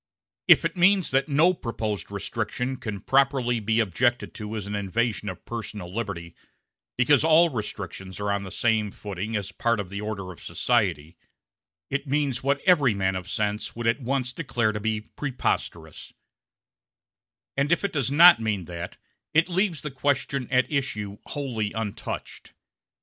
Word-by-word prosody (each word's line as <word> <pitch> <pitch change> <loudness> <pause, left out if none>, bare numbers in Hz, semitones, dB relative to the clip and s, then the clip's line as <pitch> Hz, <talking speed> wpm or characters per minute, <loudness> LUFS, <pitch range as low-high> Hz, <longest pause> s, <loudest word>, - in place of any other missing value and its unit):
If - - +7
it - - -1
means 185 +1 +4
that 135 +3 +2
no 160 +6 +4
proposed 110 - -4
restriction 115 +5 -3
can 105 -5 -5
properly 135 -2 +2
be 110 +1 +1
objected 120 +4 +1
to 105 0 -6
as 105 -3 -4
an 100 - -5
invasion 105 0 -1
of 90 - -9
personal 105 -6 -6
liberty, 95 -7 -4 0.6
because 130 +3 +4
all 165 +2 +6
restrictions 100 -5 -6
are 100 0 -1
on 100 0 0
the 95 - -7
same 110 +1 +1
footing 100 +2 -5
as 100 -1 -3
part 115 +3 0
of 100 -3 -4
the 100 +1 -5
order 105 -3 -4
of 90 - -13
society, 75 +4 0 0.7
it 140 +1 -2
means 140 -2 0
what 140 +1 +1
every 145 - +4
man 95 -1 0
of 90 0 -5
sense 105 +1 -2
would 120 0 -5
at 115 +5 +2
once 130 0 -1
declare 120 -7 0
to 105 - -4
be 110 0 -1
preposterous; 105 - -4 1.4
and 140 +3 +1
if 175 - +2
it 200 - -2
does 135 -5 0
not 170 +3 +8
mean 105 -5 -1
that 85 0 -7 0.4
it 165 +3 +4
leaves 180 -2 0
the 150 - -4
question 140 -1 -1
at 130 -1 +3
issue 105 -8 -2
wholly 120 -8 -3
untouched. 110 -3 -5
115 Hz, 160 wpm, -26 LUFS, 100-140 Hz, 1.4 s, not